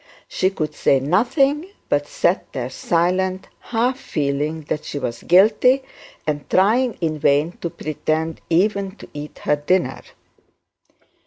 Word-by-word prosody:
She 185 - +1
could 155 -6 -3
say 135 - +3
nothing, 270 - +2 0.2
but 145 0 0
sat 180 +5 0
there 125 -1 -4
silent, 185 +5 0
half 245 +3 -1
feeling 150 +2 -2
that 150 0 -4
she - - -5
was 120 -4 -4
guilty, 225 +8 +4 0.4
and 145 -1 -3
trying 225 +6 +3
in 155 -2 -1
vain 145 +3 +3
to 170 - -2
pretend 155 +1 -3
even 195 +2 +1
to - - -12
eat 150 0 -8
her 150 - +2
dinner. 180 +5 0
170 Hz, 135 wpm, -21 LUFS, 150-200 Hz, 0.4 s, guilty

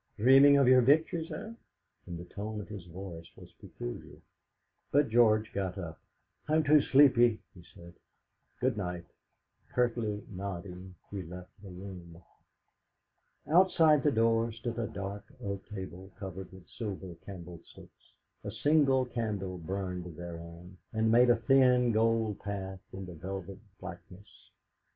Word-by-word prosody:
Dreaming 135 +5 +7
of 140 -2 +4
your 130 0 +7
victories, 160 +5 +2
eh?" 215 +9 -6 0.5
And 85 - -5
the 85 - -8
tone 105 +4 -6
of 105 - -7
his 100 -5 -8
voice 85 -1 -8
was - - -14
peculiar. - - -8 0.7
But 145 -2 +3
George 110 -2 +4
got 95 -1 -2
up. 85 -4 -6 0.5
"I'm 155 +1 +3
too 150 0 +6
sleepy," 130 -5 +5
he 90 - -14
said; 85 0 -13 0.7
"good - - +1
night." 90 -3 -4 0.7
Curtly 115 -4 0
nodding, 95 -1 -7 0.2
he 100 -2 -4
left 90 +1 -10
the 100 - -10
room. 90 -2 -10 1.3
Outside 160 -3 +5
the 150 - +3
door 115 -1 +2
stood 115 +1 -5
a 115 - -1
dark 100 +1 -6
oak 100 -4 -5
table 95 -2 -8
covered 95 -1 -7
with 95 -2 -14
silver 95 -5 -6
candlesticks; 90 -3 -12 0.3
a - - -4
single 140 -4 +3
candle 105 -7 -3
burned 90 -1 -5
thereon, 85 +1 -9
and 110 0 +1
made 120 +2 +6
a 120 - +6
thin 125 0 +4
gold 110 -1 +1
path 95 -2 -5
in 95 0 -7
the 90 - -9
velvet 95 +3 -7 0.2
blackness. 90 +1 -12
100 Hz, 135 wpm, -31 LUFS, 90-120 Hz, 1.3 s, Dreaming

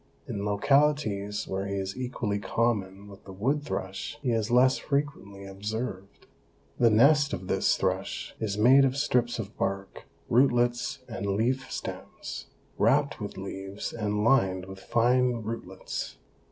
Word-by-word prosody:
In 100 - -4
localities 105 -2 +1
where 95 +1 -2
he 100 - -2
is 95 0 -3
equally 120 -5 -2
common 100 -3 -1
with 100 -1 -13
the 95 - -9
wood 130 +10 0
thrush 120 0 -4
he 125 - +1
is 110 -1 0
less 125 +2 +4
frequently 140 -9 -3
observed. 100 0 -5 0.5
The 120 - +6
nest 140 +5 +5
of 95 -1 -4
this - - +2
thrush - - -2
is 105 -2 -2
made 130 +6 +7
of 135 0 +1
strips 125 -4 +1
of 105 -3 -6
bark, 95 0 -3 0.2
rootlets 120 +1 +2
and 110 -4 -4
leaf 120 +7 0
stems, - - -6 0.3
wrapped 140 -2 +2
with 100 - -5
leaves 95 +1 -5
and 105 -2 -1
lined 95 -7 +3
with 95 0 -10
fine 120 +1 +2
rootlets. 105 -4 -5
110 Hz, 140 wpm, -28 LUFS, 100-125 Hz, 0.5 s, made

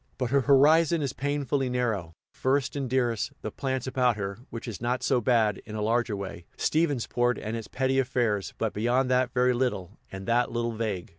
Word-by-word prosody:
But 125 -2 -2
her 140 0 +4
horizon 155 +4 +4
is 135 -2 -2
painfully 140 -1 -1
narrow 110 -10 -1 0.2
first 135 +1 0
and 135 -3 -2
dearest, 120 -4 0
the 110 - -3
plants 130 +1 -3
about 125 -3 +1
her, 100 +1 -4
which 115 +1 -7
is 115 - -6
not 125 +1 -1
so 125 -3 +2
bad; 110 -3 +2
in 110 - -8
a 105 - -3
larger 115 0 +1
way, 95 -3 -7
Stephensport 125 -6 +1
and 110 +2 -4
its 115 -2 -5
petty 130 0 0
affairs; 120 -6 0
but 110 -2 -1
beyond 125 +4 +1
that 125 0 +2
very 125 0 +3
little, 115 -6 -2
and 95 0 -7
that 120 +1 +2
little 120 0 -1
vague. 110 -6 -3
120 Hz, 195 wpm, -27 LUFS, 110-130 Hz, 0.2 s, her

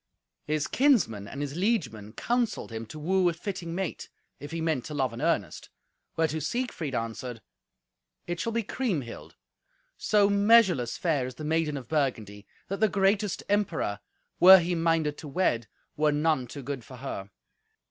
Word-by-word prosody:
His 155 0 0
kinsmen 205 - +2
and 140 - -6
his 145 0 -5
liegemen 140 - -1
counselled 240 - -1
him 115 0 -6
to 155 - -9
woo 180 +4 +2
a - - -2
fitting 170 -1 -5
mate, 190 -2 -4 0.3
if 145 - -8
he 165 - -4
meant 160 -6 0
to 150 - -6
love 130 -4 0
in 115 - -7
earnest, 155 - -1 0.5
whereto 160 -1 0
Siegfried 160 - -3
answered, 115 +1 -4 0.9
"It 175 0 -4
shall 230 - -1
be 230 0 0
Kriemhild. 190 - -4 0.6
So 205 -2 +3
measureless 200 - +4
fair 150 -7 0
is 130 - -8
the 155 - -8
maiden 155 -1 0
of 125 -3 -8
Burgundy, 110 -9 -2 0.2
that 195 - -4
the 220 0 +4
greatest 195 0 +1
emperor, 185 - 0 0.4
were 190 +2 +10
he 175 0 0
minded 165 -3 +1
to 155 - -8
wed, 135 -7 0 0.3
were 150 0 +2
none 150 -3 +1
too 140 +3 -8
good 135 -2 -5
for 130 - -12
her." 120 -6 -6
155 Hz, 165 wpm, -28 LUFS, 130-190 Hz, 0.9 s, were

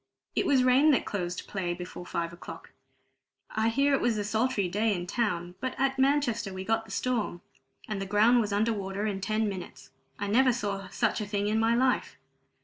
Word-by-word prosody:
"It - - +1
was 270 -3 +4
rain 255 +4 +5
that - - +1
closed 180 -3 -4
play 180 -3 -2
before 180 0 -8
five 170 0 -3
o'clock. 175 - -10 0.8
I 220 +1 +1
hear 275 +4 +2
it 275 - +2
was 235 -2 +1
a 205 - -1
sultry 220 -1 0
day 210 +4 +1
in 175 -1 -4
town, 180 -5 -1
but 260 - -4
at 270 0 +1
Manchester 265 -7 +2
we 190 0 -6
got 225 +1 0
the - - -16
storm, 230 -8 -1 0.5
and 210 -2 -3
the 195 - -4
ground 220 +5 +4
was 210 -2 -2
under 215 +3 +2
water 200 0 -3
in 200 -2 -2
ten 215 +2 0
minutes. 185 -3 -7 0.3
I 205 - -3
never 250 +5 +4
saw 200 -5 -3
such 220 +3 0
a 210 - -4
thing 205 0 -1
in 220 +1 +1
my 225 +1 +3
life. 255 +1 +1
215 Hz, 205 wpm, -28 LUFS, 195-240 Hz, 0.8 s, rain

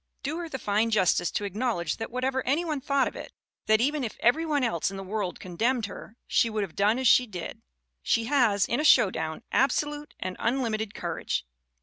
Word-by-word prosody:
Do 310 +4 -3
her 340 -1 -5
the 265 - -4
fine 215 -1 +1
justice 180 -5 +2
to - - -3
acknowledge 200 -5 -2
that 225 - -5
what 250 +1 -4
ever 260 0 0
any 295 +7 +1
one 305 -4 -2
thought 275 -1 +1
of - - -6
it, - - -9 0.3
that 220 0 +5
even 290 +2 +1
if 225 - -5
every 315 +8 +2
one 290 -3 +1
else 195 -9 0
in 195 - -7
the 195 - -6
world 195 -1 -3
condemned 225 +7 -1
her, 220 +3 -10
she 230 - +2
would 215 -1 -1
have 185 -5 -7
done 210 +4 +3
as 260 -1 +1
she 250 +2 +5
did. 180 -6 -7 0.4
She 230 - +1
has, 225 -6 +3
in 240 - -1
a - - 0
showdown, 185 - +3
absolute 295 +2 0
and 185 0 -4
unlimited 220 -4 -1
courage. 170 - -3
230 Hz, 215 wpm, -27 LUFS, 200-265 Hz, 0.4 s, that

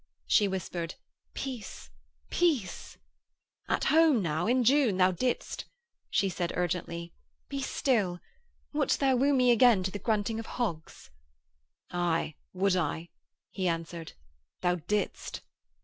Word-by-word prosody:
She 210 - +4
whispered: 175 -3 -4 0.4
'Peace. 250 -7 -6 0.4
Peace.' 280 - 0 0.7
'At - - +1
home 310 -8 +5
now. 160 +2 0
In 250 +2 +3
June, 255 -5 +4
thou 185 0 +5
didst....' 245 +8 -2 0.4
She 200 - +2
said 175 -2 -2
urgently: 170 -1 -2 0.4
'Be 275 -1 -3
still. 210 -11 0 0.5
Wouldst 295 -2 +1
thou 270 -2 +3
woo 275 +3 +3
me 250 -3 +4
again 235 -4 +5
to 190 - -2
the 205 - -5
grunting 220 +1 0
of 225 - -6
hogs?' 165 - -4 0.8
'Aye, 170 -3 0 0.2
would 190 0 +2
I,' 170 -1 -1 0.4
he 185 -2 -1
answered. 165 -1 -3 0.5
'Thou 180 0 +2
didst....' 210 0 -2
195 Hz, 125 wpm, -29 LUFS, 175-250 Hz, 0.8 s, home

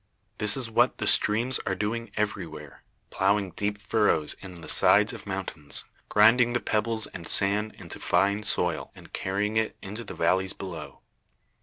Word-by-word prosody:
This 105 +4 +3
is 130 -3 -2
what 115 - +2
the - - -3
streams 120 +5 +3
are 95 - 0
doing 115 +4 -3
everywhere 80 - -4 0.3
plowing 100 0 +1
deep 105 +2 -3
furrows 105 -8 +1
in 95 -2 -10
the - - -10
sides - - +4
of - - -9
the - - -9
mountains, 75 -1 -3 0.2
grinding 115 +3 +5
the 120 - +1
pebbles 110 0 0
and 85 -2 -10
sand 105 +2 +3
into 85 -4 -9
fine 100 +4 +1
soil, 90 -6 -1
and - - -16
carrying 105 +3 -2
it 110 0 -1
into 105 +4 -7
the - - -9
valleys 95 +3 +1
below. 90 -4 -9
105 Hz, 165 wpm, -26 LUFS, 95-110 Hz, 0.3 s, grinding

